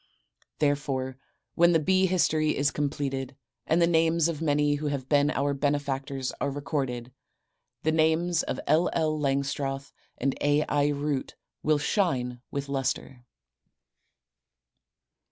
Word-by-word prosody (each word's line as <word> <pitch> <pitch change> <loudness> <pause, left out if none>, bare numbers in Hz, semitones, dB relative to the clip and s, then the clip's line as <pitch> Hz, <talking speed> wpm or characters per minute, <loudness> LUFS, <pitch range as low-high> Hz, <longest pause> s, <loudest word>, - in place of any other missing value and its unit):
Therefore, 135 -3 -1 0.3
when 170 +1 +4
the 165 - +4
bee 190 +4 +3
history 155 -4 +2
is 140 0 +2
completed, 140 -2 -2 0.3
and 160 - +3
the 170 - +5
names 165 -1 +3
of 165 -2 -3
many 145 -1 +2
who 150 - -1
have 140 -3 -3
been 145 0 +3
our 140 -1 0
benefactors 140 -2 -1
are - - +1
recorded, 135 -4 -3 0.7
the 160 - +2
names 160 +2 +2
of - - -4
L. 160 +5 +3
L. 155 -2 0
Langstroth 140 0 -2 0.2
and 135 +1 0
A. 145 +1 +3
I. 145 -1 +1
Root 145 -1 -2 0.3
will 155 -1 +3
shine 130 -7 0
with 140 0 -4
lustre. 135 -2 -3
145 Hz, 130 wpm, -27 LUFS, 135-155 Hz, 0.7 s, the